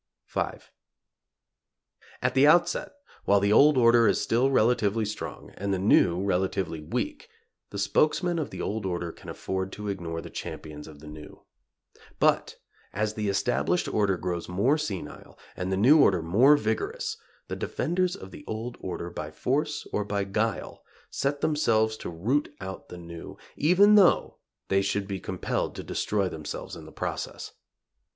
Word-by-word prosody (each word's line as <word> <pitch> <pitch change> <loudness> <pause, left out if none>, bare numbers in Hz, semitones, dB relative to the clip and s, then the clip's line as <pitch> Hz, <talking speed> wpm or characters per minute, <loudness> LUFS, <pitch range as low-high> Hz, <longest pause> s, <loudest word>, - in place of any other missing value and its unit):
V. - - -2 1.8
At - - +2
the 135 +2 +5
outset, 175 - +3 0.3
while 100 0 +5
the 100 +1 +2
old 145 +4 +6
order 115 -1 +6
is - - +3
still 125 +4 +2
relatively 110 -3 +2
strong, 105 +1 -6
and 100 +1 -2
the 95 - +1
new 90 -2 +4
relatively 95 -3 -1
weak, 295 - -4 0.4
the - - -7
spokesmen 175 +2 +1
of 150 - -3
the - - -6
old 110 +1 -2
order 85 -2 -3
can - - -12
afford 95 0 -3
to 105 0 -5
ignore 85 -4 -4
the - - -9
champions 75 -1 -7
of 75 -2 -13
the 75 - -11
new. 75 0 -11 0.8
But - - +2 0.4
as 105 +2 -1
the 105 -1 -2
established 100 - +1
order 100 -3 +1
grows 90 -1 -4
more 100 +11 +2
senile 130 - -6 0.2
and 90 +1 -3
the 95 - +1
new 140 +10 +6
order 90 -4 +4
more 120 - +5
vigorous, 435 - -2 0.3
the - - -4
defenders 180 +1 -1
of 95 - -10
the 150 - -11
old 115 +3 -5
order, 90 -1 -5
by 75 -3 -5
force 145 - -1
or 105 - +1
by 100 0 -1
guile, 105 +2 -2 0.3
set 140 +1 -1
themselves 110 -8 +2
to - - -6
root 115 - 0
out 95 0 -7
the 90 - -8
new, 85 -1 -9 0.2
even 185 +7 +5
though 200 -4 +4 0.3
they 95 0 +3
should 100 0 -1
be 100 -1 -4
compelled 95 0 -3
to - - -6
destroy 100 -2 -1
themselves 80 -4 -6
in - - -10
the - - -12
process. - - -5
105 Hz, 160 wpm, -27 LUFS, 95-140 Hz, 1.8 s, old